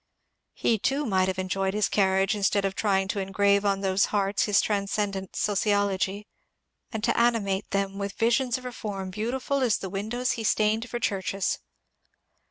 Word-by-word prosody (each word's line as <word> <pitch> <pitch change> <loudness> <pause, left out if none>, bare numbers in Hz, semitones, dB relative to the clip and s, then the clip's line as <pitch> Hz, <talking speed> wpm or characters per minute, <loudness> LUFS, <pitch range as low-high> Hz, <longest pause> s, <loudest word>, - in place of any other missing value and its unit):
He 225 -2 +1
too 280 +7 0
might 190 -3 +2
have 190 -1 -2
enjoyed 190 +1 -1
his 210 -1 +2
carriage 195 -1 +2
instead 200 -1 +1
of 195 - -1
trying 195 -2 +1
to 200 - -1
engrave 200 +1 +2
on 200 -1 +1
those 190 0 +2
hearts 200 -1 0
his 205 -1 +3
transcendent 200 -2 -1
sociology 205 -1 0 0.7
and 220 -3 -4
to - - +2
animate 215 -5 +1
them 195 0 -1
with 200 0 -3
visions 240 +2 +1
of 255 - -11
reform 205 -6 -5
beautiful 255 +7 -2
as 240 -5 +3
the 190 - -6
windows 220 +6 -2
he 225 - -3
stained 220 +2 +1
for 240 - -3
churches. 195 -3 -1
200 Hz, 165 wpm, -26 LUFS, 195-220 Hz, 0.7 s, his